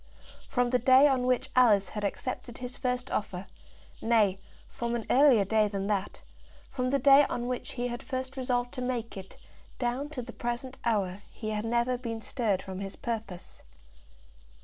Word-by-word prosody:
From 245 -1 +1
the 250 - +3
day 260 +4 +7
on 255 -3 +1
which 255 +1 +1
Alice 220 -6 +5
had 210 - -5
accepted 240 +3 -4
his 250 +1 -6
first 250 -1 -2
offer, 190 -2 -3 0.6
nay, 215 -4 +3 0.3
from 235 0 -3
an 235 - -3
earlier 255 -6 +6
day 215 +1 +3
than 195 -1 -3
that; 205 -1 -2 0.5
from 255 -2 -1
the 280 - +2
day 275 +2 +7
on 240 - -2
which 250 -1 -4
he 245 -1 -2
had 240 -1 -5
first 260 -1 -4
resolved 245 -2 -1
to 255 - -5
make 245 -2 -3
it, 190 -1 -10 0.4
down 255 +4 -2
to 275 -5 -5
the 240 - -9
present 240 +2 -4
hour, 200 -4 0
he 215 -1 -5
had 210 +1 -2
never 240 +2 +1
been 230 -2 -4
stirred 220 -4 -1
from 190 -1 -6
his 195 0 -5
purpose. 220 -6 -5
240 Hz, 175 wpm, -29 LUFS, 215-255 Hz, 0.6 s, day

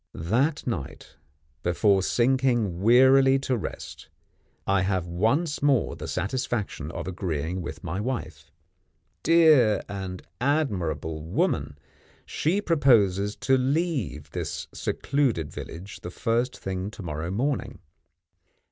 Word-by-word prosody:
That 130 - 0
night, 110 - -5 0.4
before 95 +3 +2
sinking 120 -5 +1
wearily 130 +4 +6
to 130 -1 0
rest, 110 - -7 0.6
I 95 -1 +2
have 95 -2 0
once 115 - 0
more 140 -5 +2
the - - -7
satisfaction 105 - -2
of 85 - -6
agreeing 90 -1 -3
with 85 - -7
my 90 +2 -3
wife. 125 +2 -5 0.7
Dear 155 -9 +5
and 95 -2 -6 0.2
admirable 95 - -1
woman! 75 -3 -1 0.5
she 180 +7 0
proposes 105 - +3
to 135 - +3
leave 130 - -1
this - - -4
secluded 125 - -1
village 90 +5 -8
the 90 - -6
first 115 +7 -1
thing 95 0 -4
to 105 -2 -10
morrow 80 0 -4
morning. 130 +9 -2
105 Hz, 110 wpm, -26 LUFS, 90-135 Hz, 0.7 s, wearily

